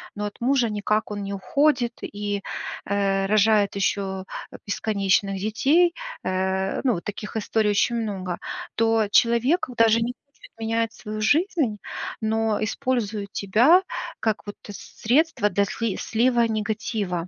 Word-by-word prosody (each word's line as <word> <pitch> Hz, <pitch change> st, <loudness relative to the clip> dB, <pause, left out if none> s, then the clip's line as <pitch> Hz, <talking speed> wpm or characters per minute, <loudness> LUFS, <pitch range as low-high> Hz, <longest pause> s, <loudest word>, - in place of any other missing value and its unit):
Но 210 Hz, 0 st, -3 dB
от 205 Hz, -, -7 dB
мужа 250 Hz, -1 st, +2 dB
никак 210 Hz, +1 st, -1 dB
он 205 Hz, -1 st, -4 dB
не 200 Hz, 0 st, -4 dB
уходит 245 Hz, +4 st, +1 dB
и, 205 Hz, -1 st, -3 dB, 0.4 s
э, 195 Hz, -1 st, +1 dB
рожает 210 Hz, 0 st, +3 dB
еще, 200 Hz, +1 st, +1 dB, 0.5 s
э, -, -, -9 dB
бесконечных 195 Hz, -2 st, +1 dB
детей, 280 Hz, -, +3 dB, 0.3 s
э- 190 Hz, +1 st, -1 dB
ну, 255 Hz, -3 st, +3 dB
вот 170 Hz, -, -6 dB
таких 210 Hz, +2 st, -5 dB
историй 215 Hz, 0 st, +1 dB
очень 230 Hz, +3 st, +2 dB
много- 185 Hz, -5 st, -4 dB, 0.4 s
то 225 Hz, -1 st, +2 dB
человек 235 Hz, -, +3 dB
даже 230 Hz, 0 st, +5 dB
не 240 Hz, +2 st, -1 dB
будет 280 Hz, -, -18 dB
менять 225 Hz, 0 st, -1 dB
свою 215 Hz, 0 st, -6 dB
жизнь, 290 Hz, -, +2 dB, 0.4 s
но 220 Hz, -1 st, 0 dB
использует 215 Hz, -4 st, -2 dB
тебя, 240 Hz, -, +5 dB, 0.4 s
как 220 Hz, -1 st, -1 dB
вот 205 Hz, -, -7 dB
с 205 Hz, -, -7 dB, 0.2 s
средство 250 Hz, -2 st, +2 dB
для 200 Hz, +1 st, +1 dB
сли 225 Hz, 0 st, -2 dB
слива 235 Hz, +1 st, +2 dB
негатива. 215 Hz, -5 st, -2 dB
215 Hz, 140 wpm, -24 LUFS, 200-235 Hz, 0.5 s, даже